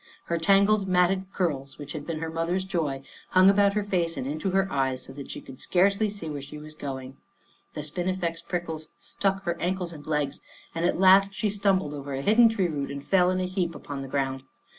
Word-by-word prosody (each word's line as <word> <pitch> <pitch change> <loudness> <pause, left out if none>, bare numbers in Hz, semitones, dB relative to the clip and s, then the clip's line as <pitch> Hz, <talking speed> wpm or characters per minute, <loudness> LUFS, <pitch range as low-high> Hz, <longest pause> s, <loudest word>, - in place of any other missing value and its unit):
Her 170 0 -2
tangled 200 +3 +4
matted 185 +1 +3
curls, 140 -8 -2
which 145 0 -8
had 150 -2 -6
been 165 -2 -3
her 165 - -2
mother's 170 +3 -1
joy, 155 -8 -2 0.3
hung 185 +1 +6
about 200 0 +4
her 210 0 0
face 175 -4 -1
and - - -3
into 155 +7 -2
her 195 +1 +2
eyes 130 -2 0
so 135 - -10
that 140 0 -9
she - - -6
could 130 - -11
scarcely 200 +4 +3
see 200 -5 -6
where 145 -2 -4
she 140 +2 -9
was 155 +1 -9
going. 135 -3 -6 0.6
The 150 - -4
spinifex 175 +2 -2
prickles 160 -3 -4
stuck 195 0 -2
her 170 -2 -1
ankles 180 -1 -2
and 145 -2 -11
legs, 150 -3 -1 0.3
and 165 +1 -1
at 180 - +1
last 195 +1 +6
she 210 - 0
stumbled 195 -6 +1
over 140 -1 -6
a 135 - -3
hidden 230 +5 +6
tree 200 -5 +1
root 145 -4 -3
and 140 0 -6
fell 180 +1 +3
in 185 0 0
a 185 - 0
heap 180 -3 -2
upon 140 -2 -6
the 135 - -6
ground. 135 -1 -1
170 Hz, 220 wpm, -27 LUFS, 145-190 Hz, 0.6 s, hung